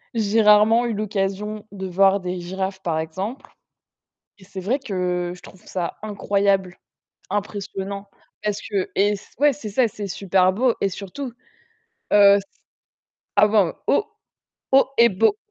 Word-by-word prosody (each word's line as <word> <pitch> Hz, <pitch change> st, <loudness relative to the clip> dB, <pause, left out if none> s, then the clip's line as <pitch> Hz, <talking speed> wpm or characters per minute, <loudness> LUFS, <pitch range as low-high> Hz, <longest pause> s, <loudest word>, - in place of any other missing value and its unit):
J'ai 220 Hz, 0 st, +2 dB
rarement 215 Hz, +3 st, +5 dB
eu 235 Hz, -, -1 dB
l'occasion 210 Hz, 0 st, -3 dB
de 190 Hz, -1 st, -6 dB
voir 195 Hz, +2 st, +3 dB
des 180 Hz, -1 st, -4 dB
girafes 190 Hz, +2 st, -4 dB
par 160 Hz, -2 st, -1 dB
exemple 190 Hz, +11 st, -5 dB, 0.9 s
et -, -, -20 dB
c'est 195 Hz, 0 st, -10 dB
vrai 245 Hz, +9 st, -1 dB
que 180 Hz, -6 st, -2 dB
je 180 Hz, -, -15 dB
trouve 190 Hz, +2 st, -16 dB
ça 175 Hz, -2 st, -4 dB
incroyable, 200 Hz, -3 st, 0 dB, 0.5 s
impressionnant. 200 Hz, 0 st, -4 dB, 0.3 s
Parce 210 Hz, 0 st, -2 dB
que 200 Hz, -3 st, -2 dB
et 200 Hz, +1 st, +3 dB
s 200 Hz, -, -7 dB
ouais, 290 Hz, 0 st, +5 dB
c'est 235 Hz, -6 st, -7 dB
ça, 235 Hz, +4 st, +2 dB
c'est 205 Hz, -1 st, -6 dB
super 185 Hz, -1 st, +2 dB
beau 240 Hz, +3 st, +2 dB
et 195 Hz, -, +2 dB
surtout, 215 Hz, +7 st, -7 dB, 0.8 s
heu, 200 Hz, -1 st, +7 dB
s 200 Hz, -, -2 dB, 1.0 s
avant 205 Hz, -4 st, +4 dB
haut 350 Hz, -, +3 dB, 0.7 s
haut 270 Hz, 0 st, +6 dB
et 235 Hz, 0 st, +6 dB
beau. 220 Hz, -, +2 dB
200 Hz, 145 wpm, -22 LUFS, 190-215 Hz, 1.0 s, heu